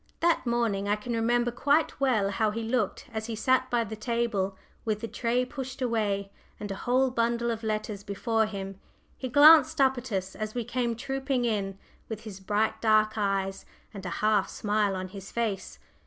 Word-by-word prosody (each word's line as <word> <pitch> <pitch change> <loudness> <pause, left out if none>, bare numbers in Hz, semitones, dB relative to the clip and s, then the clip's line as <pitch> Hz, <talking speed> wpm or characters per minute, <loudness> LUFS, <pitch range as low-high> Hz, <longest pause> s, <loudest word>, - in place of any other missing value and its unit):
That 335 -6 +2
morning 225 -4 0
I 205 - +3
can 225 +3 -5
remember 240 +1 +1
quite 285 +6 +1
well 225 -8 +2
how 215 +2 +1
he 225 +2 -3
looked 225 -3 -1
as 220 0 -3
he 230 - -3
sat 255 +3 +2
by 240 -1 +2
the 220 0 -6
table, 215 -4 -1 0.3
with 215 -2 -1
the 230 - -3
tray 245 +2 0
pushed 265 -1 -7
away, 210 -5 -1 0.3
and 205 -1 -5
a - - -3
whole 260 +1 +3
bundle 235 0 +1
of 225 -1 -4
letters 215 -2 -3
before 220 +2 0
him. 195 -2 -6 0.4
He 260 - -5
glanced 290 +2 +7
up 265 -2 +4
at 250 0 -9
us 190 -1 -2
as 215 +1 -5
we 240 - -1
came 240 0 -1
trooping 265 +1 -1
in, 200 -4 -1 0.3
with 220 -1 -5
his 205 -3 -9
bright 205 +3 0
dark 215 -1 +4
eyes 195 -2 -1 0.3
and 200 -2 -8
a 180 - -4 0.2
half 215 -2 +3
smile 205 -2 0
on 185 0 -4
his 195 0 -9
face. 220 -5 -2
220 Hz, 190 wpm, -28 LUFS, 205-245 Hz, 0.4 s, glanced